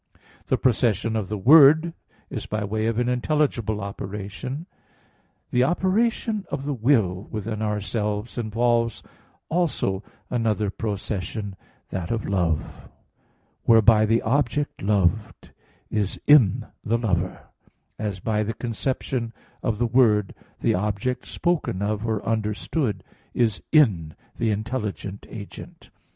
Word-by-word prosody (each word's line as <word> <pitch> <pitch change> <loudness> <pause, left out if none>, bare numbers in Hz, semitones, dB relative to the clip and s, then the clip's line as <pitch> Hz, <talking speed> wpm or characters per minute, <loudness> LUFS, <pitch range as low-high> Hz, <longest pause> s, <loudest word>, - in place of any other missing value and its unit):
The - - +2
procession 115 -3 +1
of 105 -4 -2
the 105 - -2
Word 155 - +7 0.4
is - - -5
by 105 0 -2
way 110 +2 -1
of 115 -1 0
an 120 0 +1
intelligible 125 -4 0
operation. 100 - -5 0.9
The 125 - +3
operation 210 - +1
of 140 -1 -4
the 145 - -1
will 110 -7 +1
within 110 0 -4
ourselves 105 +1 -2
involves 115 0 +1 0.4
also 150 - 0 0.3
another 110 -4 0
procession, 100 -1 -4 0.3
that 90 -3 -4
of 115 -2 -2
love, 90 -6 -1 0.8
whereby 110 -1 +6
the 115 +2 +2
object 145 +3 0
loved 100 0 0 0.4
is 105 -2 -1
in 135 -11 +5 0.2
the 115 +2 +1
lover; 90 -6 -2 0.5
as, 105 -3 -3
by 105 +2 0
the 110 +1 -2
conception 120 0 -3 0.3
of 110 - -1
the 120 - +1
word, 110 -4 +3 0.3
the - - +3
object 105 +6 -1
spoken 170 - -1
of 105 +2 -1
or 110 -2 -1
understood 110 +3 -1 0.3
is 115 -4 +1
in 100 - +3 0.2
the 115 - +1
intelligent 105 -2 -3
agent. 100 -3 -10
110 Hz, 120 wpm, -24 LUFS, 105-125 Hz, 0.9 s, Word